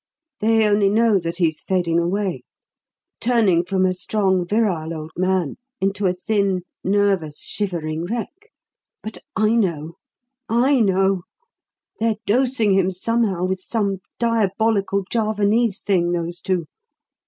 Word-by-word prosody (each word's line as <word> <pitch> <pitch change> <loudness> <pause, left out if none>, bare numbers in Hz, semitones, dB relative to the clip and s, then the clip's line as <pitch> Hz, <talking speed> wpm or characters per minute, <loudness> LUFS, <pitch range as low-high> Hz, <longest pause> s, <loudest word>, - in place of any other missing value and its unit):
They 225 0 +3
only 205 -1 +3
know 220 -1 +3
that 170 0 -4
he's 160 -4 0
fading 175 -3 +1
away 180 -4 -1 0.8
turning 220 -8 +3
from 185 +1 +1
a 185 - +2
strong, 190 -1 0
virile 175 -6 0
old 155 0 -7
man 185 -4 0 0.2
into 195 +1 0
a 180 - +1
thin, 195 0 0 0.2
nervous, 195 -6 +1
shivering 165 -5 -3
wreck. 240 - -6 0.5
But 220 - -7 0.2
I 215 +1 +2
know! 170 -6 -1 0.5
I 255 +4 +3
know! 195 -3 +2 0.8
They're 225 -1 +1
dosing 245 -2 +2
him 190 -1 +3
somehow 190 -1 0
with 185 0 -2
some 200 -2 -1 0.2
diabolical 220 -3 +1
Javanese 215 -1 +1
thing, 175 -4 +1
those 175 +1 -3
two. 180 -3 -1
195 Hz, 125 wpm, -21 LUFS, 180-220 Hz, 0.8 s, They